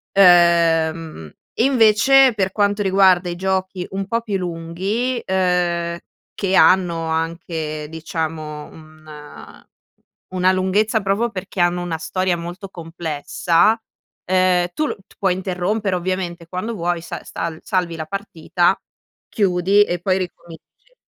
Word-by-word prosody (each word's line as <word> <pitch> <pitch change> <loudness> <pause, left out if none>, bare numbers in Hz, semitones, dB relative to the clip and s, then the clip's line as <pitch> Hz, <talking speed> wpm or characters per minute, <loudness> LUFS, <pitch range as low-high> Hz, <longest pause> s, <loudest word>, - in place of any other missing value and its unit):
Ehm, 165 - +3 0.2
invece 255 +1 +5
per 190 -2 0
quanto 205 +1 +1
riguarda 190 -2 +4
i 175 - -4
giochi 190 0 -2
un 195 0 -3
po' 230 +3 -1
più 205 -4 -2
lunghi, 185 +8 -3
ehm, 175 -2 0 0.4
che 195 -1 -2
hanno 170 -3 +4
anche 160 -2 -3
diciamo 155 -2 -5
un 155 -1 -14 0.7
una 185 0 +3
lunghezza 200 +4 +1
proprio 200 +4 0
perché 190 0 -7
hanno 175 0 +2
una 170 -2 -3
storia 180 +2 -1
molto 175 +4 -7
complessa, 165 +4 0 0.5
ehm, 185 -1 +2
tu 305 - 0
l - - -3
t - - -22
puoi 190 -2 +1
interrompere 190 +2 -2
ovviamente 175 -2 -3
quando 185 +6 -4
vuoi, 175 -2 -2
sa - - -7
sal 165 -1 -5
salvi 180 -3 -1
la 155 -1 -5
partita, 180 -1 0 0.5
chiudi 195 -1 +2
e 175 -3 -3
poi 185 +1 +1
ricominci 175 - -10
180 Hz, 125 wpm, -20 LUFS, 165-195 Hz, 0.7 s, invece